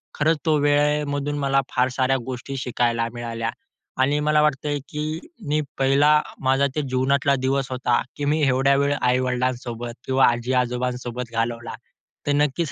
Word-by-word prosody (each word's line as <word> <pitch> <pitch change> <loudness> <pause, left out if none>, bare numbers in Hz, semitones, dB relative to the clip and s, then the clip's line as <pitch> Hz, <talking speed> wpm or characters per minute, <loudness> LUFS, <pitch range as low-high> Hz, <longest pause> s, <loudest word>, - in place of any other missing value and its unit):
खरंच 155 +1 +2
तो 155 - +4
वेळेमधून 145 0 +1
मला 135 -1 +2
फार 125 0 +2
साऱ्या 135 0 +2
गोष्टी 130 +1 -5
शिकायला 120 -2 0
मिळाल्या 115 -1 -3 0.5
आणि 145 +3 +2
मला 150 0 +3
वाटतंय, 145 0 0
की 155 +2 -3 0.3
मी 150 +1 +2 0.2
पहिला 145 +3 +4 0.2
माझा 135 +2 +3
ते 150 - +1
जीवनातला 135 +2 +2
दिवस 135 0 -1
होता, 125 -1 +1 0.2
की 145 - -2
मी 150 +2 +1
एवढ्या 135 +1 +3
वेळ 140 +1 +2
आई-वडिलांसोबत 125 -1 -1
किंवा 130 0 +4
आजी-आजोबांसोबत 125 0 -1
घालवला. 115 0 -2 0.5
तर 145 - +3
नक्कीच 150 +1 0
135 Hz, 140 wpm, -23 LUFS, 125-145 Hz, 0.5 s, तो